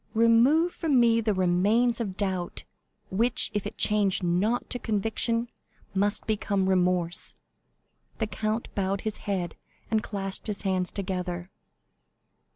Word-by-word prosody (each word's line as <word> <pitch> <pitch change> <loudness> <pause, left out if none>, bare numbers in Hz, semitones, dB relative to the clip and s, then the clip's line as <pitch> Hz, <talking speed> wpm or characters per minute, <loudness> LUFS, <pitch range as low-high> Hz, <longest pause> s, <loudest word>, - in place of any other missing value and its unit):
Remove 240 +10 +4
from 295 -6 +2
me 230 -1 +4
the 215 -2 0
remains 205 +7 +2
of 195 -4 -4
doubt, 190 -3 -2 0.5
which, 225 +5 +2
if 205 -1 -1
it - - -9
change 205 -3 +2
not 190 +8 +1
to 245 - 0
conviction, 225 +2 0 0.5
must 200 +1 0
become 200 -3 0
remorse!" 180 -2 +1 0.8
The 220 - 0
count 215 +1 -3
bowed 195 0 -1
his 215 -1 -3
head, 180 -3 -1 0.4
and 220 -1 +3
clasped 195 -1 -5
his 210 -1 -2
hands 185 -2 0
together. 180 -2 -4
205 Hz, 130 wpm, -27 LUFS, 185-230 Hz, 0.8 s, Remove